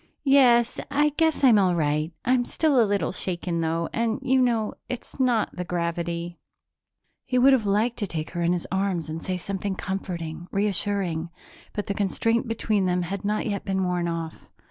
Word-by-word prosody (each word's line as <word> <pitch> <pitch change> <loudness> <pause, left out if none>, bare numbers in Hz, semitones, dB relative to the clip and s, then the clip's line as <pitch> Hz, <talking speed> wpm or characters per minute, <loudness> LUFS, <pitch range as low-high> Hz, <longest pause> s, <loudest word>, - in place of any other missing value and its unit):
"Yes, 250 -4 +5
I 295 +1 +3
guess 320 0 0
I'm 235 -6 +7
all 185 -3 +3
right. 150 0 0
I'm 250 0 +3
still 285 0 +2
a - - +4
little 200 -5 0
shaken, 175 -2 -2
though, 165 +1 0
and 225 -1 0
you 265 0 +3
know 230 -4 +1 0.2
it's 250 +2 -7
not 245 -4 +1
the 180 - -3
gravity." 170 0 -3 0.8
He 255 - -1
would 265 +2 +6
have 225 -6 +2
liked 215 +4 +1
to 205 - -2
take 160 -3 -4
her 175 - -3
in 170 0 +2
his 180 -1 -1
arms 190 -4 -1
and 160 +1 -5
say 185 -1 -2
something 195 +1 -3
comforting, 175 -4 -5
reassuring, 195 -4 -1 0.4
but 205 - -3
the 200 - -2
constraint 225 +4 0
between 215 -3 0
them 180 0 +1
had 195 +4 -4
not 210 +1 -1
yet 200 -3 -2
been 190 -1 -1
worn 180 -1 0
off. 165 -1 -5
195 Hz, 185 wpm, -25 LUFS, 170-230 Hz, 0.8 s, I'm